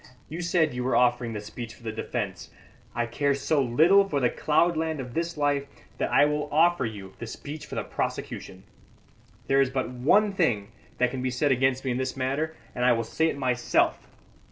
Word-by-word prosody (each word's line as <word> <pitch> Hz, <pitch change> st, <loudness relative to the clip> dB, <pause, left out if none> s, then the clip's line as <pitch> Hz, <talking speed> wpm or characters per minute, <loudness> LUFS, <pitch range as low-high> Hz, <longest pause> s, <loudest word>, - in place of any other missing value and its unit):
You 165 Hz, +3 st, -5 dB
said 170 Hz, -4 st, +2 dB
you 125 Hz, 0 st, -3 dB
were 130 Hz, -, +1 dB
offering 120 Hz, -1 st, +2 dB
the 105 Hz, -, -4 dB
speech 115 Hz, +2 st, -8 dB
for -, -, -20 dB
the 110 Hz, -, -3 dB
defence. 105 Hz, -3 st, -4 dB, 0.5 s
I 120 Hz, -, 0 dB
care 140 Hz, +4 st, 0 dB
so 140 Hz, +1 st, +1 dB
little 165 Hz, +11 st, +4 dB
for 145 Hz, -, 0 dB
the 125 Hz, -3 st, +2 dB
cloudland 160 Hz, 0 st, +1 dB
of 125 Hz, -2 st, -6 dB
this 170 Hz, +1 st, -2 dB
life 145 Hz, -1 st, +1 dB, 0.3 s
that -, -, -1 dB
I -, -, +6 dB
will 150 Hz, 0 st, -1 dB
offer 165 Hz, -3 st, +3 dB
you 100 Hz, -3 st, -8 dB
the 115 Hz, -, -6 dB
speech 145 Hz, +6 st, -8 dB
for -, -, -7 dB
the -, -, -1 dB
prosecution. 95 Hz, -1 st, -5 dB, 0.8 s
There 135 Hz, 0 st, +3 dB
is 135 Hz, -, +2 dB
but 130 Hz, -1 st, -2 dB
one 195 Hz, +12 st, +3 dB
thing 115 Hz, -, +1 dB, 0.3 s
that 125 Hz, -1 st, +2 dB
can 130 Hz, -1 st, -4 dB
be 130 Hz, -, 0 dB
said 130 Hz, +3 st, +1 dB
against 130 Hz, +1 st, +1 dB
me 130 Hz, -, 0 dB
in 120 Hz, -, -1 dB
this 130 Hz, +1 st, -3 dB
matter, 140 Hz, +5 st, -1 dB, 0.2 s
and 125 Hz, -, -2 dB
I 125 Hz, 0 st, +5 dB
will 115 Hz, 0 st, 0 dB
say 160 Hz, +8 st, 0 dB
it 155 Hz, -, -2 dB
myself. 125 Hz, -3 st, +1 dB
130 Hz, 205 wpm, -26 LUFS, 120-155 Hz, 0.8 s, I